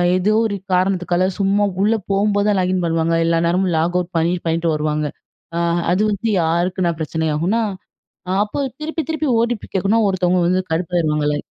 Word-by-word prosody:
ஏதோ 185 +3 +1
ஒரு 210 -2 -1 0.2
காரணத்துக்னால 180 -1 +1
சும்மா 200 +1 +2 0.2
உள்ள 215 +3 +3 0.2
போம்போ 205 +1 +2
தான் 205 -2 +2
லாகின் 185 0 0
பண்ணுவாங்க. 165 0 0
எல்லா 165 0 +2
நேரமும் 180 +1 +1
லாக் 170 +3 0
அவுட் 180 0 -5
பண்ணி 165 +2 +2
பண்ணிட்டு 165 0 0
வருவாங்க. 150 0 -1 0.5
அ - - 0 0.3
அது 185 +3 +2
வந்து 205 +3 -2
யாருக்குன்னா 175 +2 0
பிரச்சனை 160 +1 -2
ஆகும்னா? 185 +9 +1 0.8
அப்போ 210 - -6 0.2
திருப்பி 320 +1 -3
திருப்பி 315 -1 -1
ஓடிபி 235 -1 -1
கேட்கணுனா 195 +4 +2
ஒருத்தவங்க 185 -1 +1
வந்து 185 +1 +2
கடுப்பாயிருவாங்கல்ல. 155 -3 0
180 Hz, 155 wpm, -19 LUFS, 165-200 Hz, 0.8 s, உள்ள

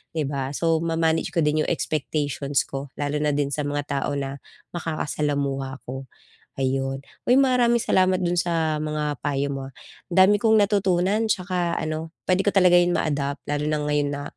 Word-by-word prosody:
di 155 - 0
ba? 135 -1 -2
So 165 -1 +2
ma-manage 165 -1 +1
ko 165 - +3
din 150 +1 +2
yung - - 0
expectations 145 -3 -1
ko, 135 +1 -6
lalo 145 +1 -2
na 150 -1 +1
din 145 -1 0
sa 145 0 -2
mga 145 0 -2
tao 140 0 -1
na 140 0 -4 0.3
makakasalamuha 145 -4 -2
ko. 130 +1 -7 0.5
Ayon. 135 +1 -1 0.2
Uy, 250 - +5
maraming 245 -3 +3
salamat 185 0 +3
dun 175 0 +1
sa 160 -3 0
mga 150 -2 -2
payo 140 0 -1
mo, 135 -1 -5
ah. - - -37 0.4
Ang - - -2
dami 205 +2 +5
kong 220 0 +4
natutunan 200 +1 +2
tsaka 180 -4 -1
ano, 155 +1 -4 0.2
puwede 190 +2 +2
ko - - +5
talaga 180 -2 +6
'yun 175 0 +2
ma-adapt, 140 -2 -1
lalo 145 +1 -1
na 155 -1 0
ngayon 145 -1 +1
na 145 0 -4
150 Hz, 180 wpm, -24 LUFS, 140-175 Hz, 0.5 s, talaga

